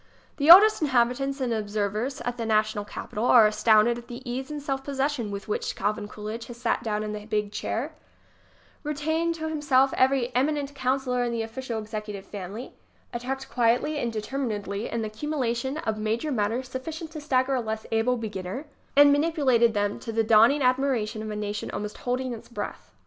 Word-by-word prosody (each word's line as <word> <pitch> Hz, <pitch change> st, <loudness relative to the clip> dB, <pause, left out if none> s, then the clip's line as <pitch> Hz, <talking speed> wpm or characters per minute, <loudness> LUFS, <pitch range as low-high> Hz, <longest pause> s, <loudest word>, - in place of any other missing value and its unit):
The 285 Hz, +2 st, +1 dB
oldest 410 Hz, +4 st, +9 dB
inhabitants 270 Hz, 0 st, +1 dB
and 245 Hz, -3 st, 0 dB
observers 215 Hz, +4 st, -2 dB
at 245 Hz, 0 st, -3 dB
the 235 Hz, -, -3 dB
na 215 Hz, -1 st, +3 dB
tional 210 Hz, -1 st, -5 dB
capital 215 Hz, +2 st, -4 dB
are 240 Hz, -3 st, +7 dB
astounded 215 Hz, +2 st, +4 dB
at 240 Hz, -, -14 dB
the 245 Hz, +1 st, -9 dB
ease 260 Hz, +3 st, -4 dB
and 300 Hz, -1 st, -4 dB
self 270 Hz, -2 st, -3 dB
possession 275 Hz, -4 st, -1 dB
with 200 Hz, -1 st, -6 dB
which 210 Hz, -, -2 dB
Calvin 210 Hz, +1 st, -2 dB
Coolidge 215 Hz, +2 st, -7 dB
has 240 Hz, -, -9 dB
sat 240 Hz, -1 st, 0 dB
down 215 Hz, -1 st, -2 dB
in 210 Hz, 0 st, -4 dB
the 210 Hz, 0 st, -7 dB
big 210 Hz, -2 st, -1 dB
chair, -, -, -3 dB, 0.9 s
retained 315 Hz, +3 st, -1 dB
to 315 Hz, -1 st, -4 dB
himself 280 Hz, -4 st, +2 dB
every 260 Hz, -1 st, +2 dB
eminent 285 Hz, +2 st, 0 dB
counsellor 255 Hz, -2 st, 0 dB
in 240 Hz, -, -1 dB
the 230 Hz, -1 st, -1 dB
official 230 Hz, +1 st, -5 dB
executive 210 Hz, -2 st, -6 dB
family, 205 Hz, +5 st, -7 dB, 0.4 s
attacked 265 Hz, +3 st, -4 dB
quietly 245 Hz, +6 st, +1 dB
and 240 Hz, -4 st, -1 dB
determinedly 215 Hz, -3 st, -3 dB
an 230 Hz, -1 st, -2 dB
accumulation 260 Hz, +2 st, -2 dB
of 220 Hz, -7 st, -2 dB
major 225 Hz, +8 st, -1 dB
matters 235 Hz, +2 st, -1 dB
sufficient 310 Hz, +5 st, -6 dB
to 310 Hz, -1 st, -7 dB
stagger 265 Hz, -2 st, +1 dB
a 255 Hz, -, +1 dB
less 220 Hz, -1 st, -4 dB
able 225 Hz, +3 st, +2 dB
be 225 Hz, -1 st, -4 dB
ginner 190 Hz, +7 st, -5 dB, 0.3 s
ŌĆö -, -, +10 dB
and 285 Hz, -, +6 dB
manipulated 285 Hz, -7 st, +3 dB
them 205 Hz, 0 st, 0 dB
to 230 Hz, -, -6 dB
the 225 Hz, 0 st, +1 dB
dawning 230 Hz, +6 st, +5 dB
ad 255 Hz, 0 st, +4 dB
miration 235 Hz, -5 st, -1 dB
of 215 Hz, -, -5 dB
a 210 Hz, -, -4 dB
nation 210 Hz, 0 st, -4 dB
almost 210 Hz, 0 st, -5 dB
holding 250 Hz, 0 st, -2 dB
its 225 Hz, -, -10 dB
breath. 240 Hz, -, -6 dB
240 Hz, 190 wpm, -26 LUFS, 215-270 Hz, 0.9 s, ŌĆö